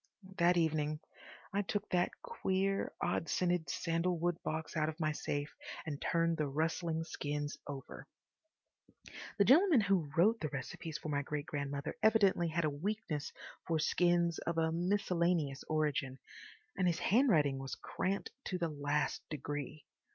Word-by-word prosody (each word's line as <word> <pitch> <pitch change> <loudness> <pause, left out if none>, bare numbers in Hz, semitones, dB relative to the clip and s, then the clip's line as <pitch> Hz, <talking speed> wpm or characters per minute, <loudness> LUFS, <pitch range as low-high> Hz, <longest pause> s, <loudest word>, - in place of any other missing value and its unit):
That 175 +1 +5
evening 155 -2 +1 0.5
I 200 - +2
took 205 +1 -2
that 180 0 0
queer, 195 - 0
odd 165 - 0
scented 175 -2 +1
sandalwood 170 0 0
box 160 +1 -3
out 155 -1 +1
of 160 +2 -7
my 155 -1 +1
safe 145 -1 -3 0.3
and 145 -3 -4
turned 165 -1 +1
the 150 - 0
rustling 160 +3 -1
skins 145 -2 -3
over. 140 -2 -7 1.3
The 200 - +5
gentleman 310 - +6
who 190 -7 +2
wrote 220 +7 +5
the 155 - -2
recipes 150 +4 -5
for 155 - -6
my 145 -1 +1
great 145 +1 -3
grandmother 140 0 -3
evidently 200 -5 +4
had 165 0 0
a - - +2
weakness 155 -2 -3 0.4
for 165 - +2
skins 170 +1 +2
of 170 0 -3
a 160 0 +2
miscellaneous 170 -5 +1
origin, 150 -4 0 0.6
and 185 -2 +2
his 170 -2 +2
handwriting 175 - +3
was 135 -1 -5
cramped 195 +2 -2
to 185 - -2
the 170 -2 -1
last 145 0 -1
degree. 145 0 -5
165 Hz, 145 wpm, -34 LUFS, 150-180 Hz, 1.3 s, gentleman